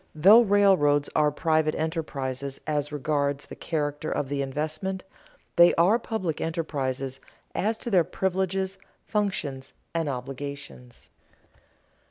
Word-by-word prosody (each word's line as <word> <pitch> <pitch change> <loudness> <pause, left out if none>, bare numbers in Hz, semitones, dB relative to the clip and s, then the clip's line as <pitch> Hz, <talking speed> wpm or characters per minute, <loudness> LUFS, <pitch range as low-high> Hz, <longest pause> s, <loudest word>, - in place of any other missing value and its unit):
Though 200 +9 +8
railroads 190 -9 +3
are 150 -1 +4
private 155 0 +1
enterprises 140 -4 -3
as 150 -1 -1
regards 145 -1 -1
the - - -10
character 150 -1 -3
of 135 - -2
the 140 -1 -1
investment, 155 +7 -3 0.5
they 175 0 +7
are 190 +8 +4
public 190 -9 -3
enterprises 135 -5 -2 0.3
as 220 +3 0
to 235 - -5
their 180 -4 +5
privileges, 190 +1 -1 0.3
functions, 150 -11 -2 0.2
and 165 -3 -1
obligations. 135 -1 -7
155 Hz, 115 wpm, -26 LUFS, 140-185 Hz, 0.5 s, Though